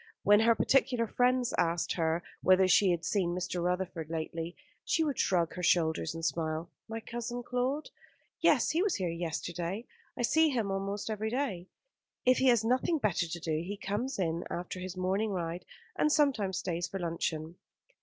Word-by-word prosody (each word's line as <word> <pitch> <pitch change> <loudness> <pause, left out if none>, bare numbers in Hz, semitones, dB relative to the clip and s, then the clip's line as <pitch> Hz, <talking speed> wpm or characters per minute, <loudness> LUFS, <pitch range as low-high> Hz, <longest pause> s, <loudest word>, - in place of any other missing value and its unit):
When 205 +1 +6
her 230 +1 +5
particular 250 -1 +2
friends 250 +2 +1
asked 170 -1 +1
her 165 0 0 0.2
whether 185 0 +5
she 190 +1 +5
had 170 -1 0
seen 180 -4 0
Mr. 180 -1 -2
Rutherford 180 -3 -2
lately, 165 +1 -4 0.3
she 325 - +1
would 290 -5 -2
shrug 170 -3 +2
her 180 - -5
shoulders 165 -2 +2
and 165 0 -4
smile. 160 0 -2 0.2
"My 225 0 -4
cousin 240 +1 -5
Claude? 255 +5 -2 0.5
Yes, - - +4
he 330 - +1
was 400 -2 +1
here 180 -4 -1
yesterday. 175 +4 -3 0.3
I - - -1
see 315 +6 +4
him 230 -8 -1
almost 200 +2 -3
every 215 +1 -2
day. 230 -8 -2 0.6
If 255 0 +5
he 265 - +3
has 240 -4 +5
nothing 255 +7 +2
better 205 - 0
to 170 +1 -5
do 160 -2 -1
he 200 +4 -5
comes 210 +7 -3
in 170 -2 -1
after 180 +1 -4
his 185 0 -6
morning 190 +4 0
ride, 175 -2 -3 0.3
and 300 - +2
sometimes 250 - +2
stays 175 0 -2
for 195 - -5
luncheon." 165 -1 -3
190 Hz, 175 wpm, -31 LUFS, 170-240 Hz, 0.6 s, When